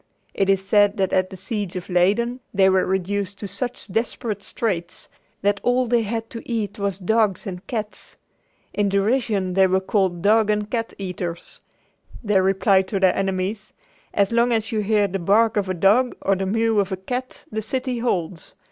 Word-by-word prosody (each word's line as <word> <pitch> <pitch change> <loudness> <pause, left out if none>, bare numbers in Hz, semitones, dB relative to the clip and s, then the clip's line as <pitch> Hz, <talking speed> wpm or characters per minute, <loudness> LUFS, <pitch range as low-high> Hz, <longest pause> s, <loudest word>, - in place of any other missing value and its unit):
It 195 0 0
is 195 0 +1
said 205 +1 +4
that 190 -2 0
at 185 0 +2
the 190 - -9
siege 200 -1 -4
of 180 -1 -5
Leyden 205 +8 +1 0.2
they 190 -1 +5
were 190 0 +2
reduced 195 +1 -2
to 205 - -5
such 240 +6 -4
desperate 225 0 -2
straits 180 -5 -3 0.3
that 205 0 +2
all 250 +1 +2
they 240 0 +2
had 225 +1 -3
to 230 - -6
eat 215 -4 -2
was 200 -2 -1
dogs 210 0 +1
and 185 -1 -7
cats. 215 -3 -4 0.6
In 205 -1 +1
derision 200 -2 +1
they 190 0 +5
were 190 +1 +2
called 190 -3 0
"dog 215 +1 +4
and 210 0 0
cat 230 -2 -2
eaters." 180 -3 -5 0.6
They 205 -3 +3
replied 190 0 +3
to 195 0 -2
their 190 -1 +4
enemies: 195 +2 -2 0.4
"As 200 0 +1
long 235 +1 +3
as 225 -1 0
you 220 - 0
hear 210 0 +2
the 195 0 -3
bark 215 +5 +3
of 200 -3 0
a 185 - -1
dog 210 +8 +3
or 195 - +3
the 190 0 -2
mew 225 +1 +2
of 200 -1 0
a 190 - -2
cat 250 +7 -5
the 220 0 -2
city 250 +2 -3
holds. 180 -7 -3
200 Hz, 190 wpm, -22 LUFS, 190-225 Hz, 0.6 s, they